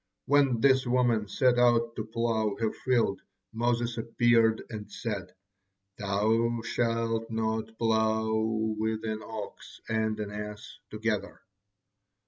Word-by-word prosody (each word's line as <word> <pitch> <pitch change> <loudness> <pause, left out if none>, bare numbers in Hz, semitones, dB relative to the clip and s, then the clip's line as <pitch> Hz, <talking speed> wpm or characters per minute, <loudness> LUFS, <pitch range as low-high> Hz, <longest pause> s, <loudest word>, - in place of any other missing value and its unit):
When 140 -4 +3
this 130 -1 +4
woman 120 -4 +2
set 125 +4 +2
out 115 -1 +3
to 110 - -3
plow 110 -2 0
her 110 -1 0
field, 120 -6 0 0.3
Moses 120 0 0
appeared 115 -1 +3
and 105 -2 -7
said: 100 -6 -5 0.6
'Thou 110 +4 +1
shalt 115 -1 -1
not 110 0 -2
plow 110 -1 +1 0.5
with 110 0 -1
an 110 0 -3
ox 110 -2 -8
and 110 -1 0
an 105 -1 -4
ass 105 0 -7
together.' 110 -1 -3
110 Hz, 115 wpm, -29 LUFS, 110-115 Hz, 0.6 s, this